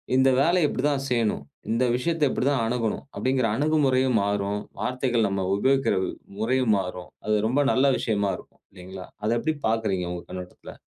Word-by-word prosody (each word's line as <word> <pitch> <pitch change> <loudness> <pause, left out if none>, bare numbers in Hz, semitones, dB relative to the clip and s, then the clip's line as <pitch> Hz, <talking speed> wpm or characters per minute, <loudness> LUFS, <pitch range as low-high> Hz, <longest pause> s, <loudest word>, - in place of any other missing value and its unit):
இந்த 130 +1 +5
வேலைய 170 0 +3
இப்படி 130 - -3
தான் 135 -1 -1
செய்யணும். 115 -4 0 0.3
இந்த 120 +3 +2
விஷயத்தை 160 +4 +1
இப்படி 125 - -1
தான் 135 -5 +1
அணுகணும்! 115 +1 -2
அப்படிங்கற 130 -2 +1
அணுகுமுறையும் 130 -4 +2
மாறும். 100 0 -1 0.2
வார்த்தைகள் 125 -3 +1
நம்ம 95 -1 -1
உபயோகிக்கிற 135 +5 +2 0.4
முறையும் 120 0 +2
மாறும். 90 -1 -6 0.2
அது, 110 0 +2
ரொம்ப 135 +5 +2
நல்ல 130 - +3
விஷயமா 100 -3 0
இருக்கும், - - -17
இல்லிங்களா? 95 0 -9 0.2
அதை 110 +2 +1
எப்படி 155 +5 -1
பாக்குறீங்க, 110 -5 0
உங்க 90 -1 -5
கண்ணோட்டத்துல? 90 0 -9
120 Hz, 160 wpm, -25 LUFS, 100-130 Hz, 0.4 s, இந்த